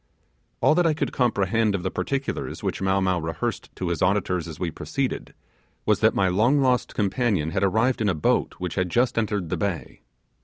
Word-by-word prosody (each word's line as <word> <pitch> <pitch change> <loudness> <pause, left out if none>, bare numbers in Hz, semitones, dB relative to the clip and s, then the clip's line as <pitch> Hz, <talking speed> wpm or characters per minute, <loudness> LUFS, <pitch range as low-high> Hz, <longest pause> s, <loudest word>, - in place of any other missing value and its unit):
All - - +5
that 175 +1 +3
I 155 - +2
could - - -2
comprehend 110 -3 +1
of 90 - -3
the 95 - -1
particulars 140 -1 -3
which - - -2
Mow 95 0 +2
Mow 95 -1 +1
rehearsed 80 0 -3
to 90 - -3
his 85 -3 -2
audience 90 -3 +1
as 80 - -8
we 85 -3 -2
proceeded, - - -3 0.5
was - - +3
that - - +3
my 95 - +3
long 110 +10 +3
lost 130 -2 +1
companion 100 - 0
had 95 +1 0
arrived 110 +6 +2
in 105 - +2
a 90 - +1
boat 75 - +1
which 90 -1 -4
had 95 -2 -1
just 120 +5 +2
entered 105 -6 -1
the - - -1
bay. 100 -5 -3
100 Hz, 200 wpm, -24 LUFS, 90-120 Hz, 0.5 s, All